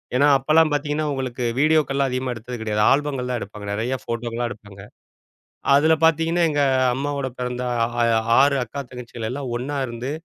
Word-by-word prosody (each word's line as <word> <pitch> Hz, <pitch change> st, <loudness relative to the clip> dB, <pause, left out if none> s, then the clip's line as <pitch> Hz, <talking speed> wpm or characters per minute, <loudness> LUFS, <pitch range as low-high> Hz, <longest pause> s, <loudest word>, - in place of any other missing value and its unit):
ஏன்னா 140 Hz, +3 st, +4 dB
அப்பல்லாம் 155 Hz, +3 st, +3 dB
பாத்தீங்கன்னா 150 Hz, +1 st, -1 dB
உங்களுக்கு 130 Hz, -2 st, -4 dB, 0.2 s
வீடியோகெல்லாம் 140 Hz, -3 st, +2 dB
அதிகமா 130 Hz, 0 st, -2 dB
எடுத்தது 120 Hz, +2 st, -7 dB
கிடையாது. 105 Hz, -1 st, -1 dB
ஆல்பங்கள் 135 Hz, -3 st, 0 dB
தான் 120 Hz, -, -1 dB
எடுப்பாங்க. 105 Hz, 0 st, -8 dB
நிறைய 120 Hz, +5 st, -1 dB
ஃபோட்டோலா 115 Hz, 0 st, -3 dB
எடுப்பாங்க. 100 Hz, -3 st, -11 dB, 0.9 s
அதுல 155 Hz, +3 st, +4 dB
பாத்தீங்கன்னா 165 Hz, +2 st, +3 dB
எங்க 145 Hz, -1 st, 0 dB, 0.3 s
அம்மாவோட 140 Hz, 0 st, -2 dB
பிறந்த, 125 Hz, 0 st, -3 dB, 0.4 s
ஆ -, -, +4 dB, 0.4 s
6 140 Hz, 0 st, +4 dB
அக்கா, 125 Hz, +4 st, -7 dB
தங்கச்சிகள் 120 Hz, -2 st, -7 dB
எல்லா 140 Hz, +3 st, -4 dB
ஒண்ணா 135 Hz, +4 st, -3 dB
இருந்து 120 Hz, +2 st, -6 dB
130 Hz, 150 wpm, -22 LUFS, 120-145 Hz, 0.9 s, ஏன்னா